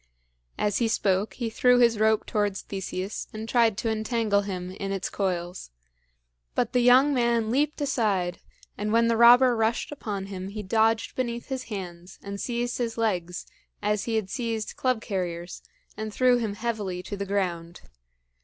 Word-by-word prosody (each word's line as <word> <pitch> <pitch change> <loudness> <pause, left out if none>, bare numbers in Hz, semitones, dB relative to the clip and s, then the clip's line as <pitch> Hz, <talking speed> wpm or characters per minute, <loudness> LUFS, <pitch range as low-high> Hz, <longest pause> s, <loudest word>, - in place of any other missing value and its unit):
As 205 -1 0
he 235 - +2
spoke 200 -2 0
he 240 - -3
threw 250 +2 +4
his 235 -3 +4
rope 220 0 +3
towards 205 -2 -1
Theseus 190 +1 -5
and 220 +1 -6
tried 230 -3 +3
to 225 - -1
entangle 220 -2 +1
him 185 -2 -5
in 195 +1 -5
its 195 -1 -3
coils. 180 - -3 0.9
But 235 - 0
the 250 - +4
young 255 +4 +6
man 235 -3 +1
leaped 295 +4 +1
aside, 200 -10 0 0.4
and 210 +1 -1
when 230 +1 +4
the 230 - +3
robber 240 +2 +7
rushed 225 +4 0
upon 205 -9 -4
him, 190 -1 -6
he 210 +2 -6
dodged 225 +3 +1
beneath 240 -1 -3
his 260 -1 -3
hands 180 -5 -7
and 200 0 -6
seized 240 0 -2
his 230 -2 -2
legs, 180 -6 -1 0.3
as 210 -1 0
he 230 - -1
had 205 -4 -1
seized 230 -4 -3
Club 255 -3 0
carrier's, 175 -4 -4 0.3
and 215 0 -5
threw 250 +2 +4
him 220 -4 -2
heavily 205 -6 -3
to 205 - -5
the 200 0 -4
ground. 175 -4 -2
215 Hz, 170 wpm, -26 LUFS, 195-235 Hz, 0.9 s, robber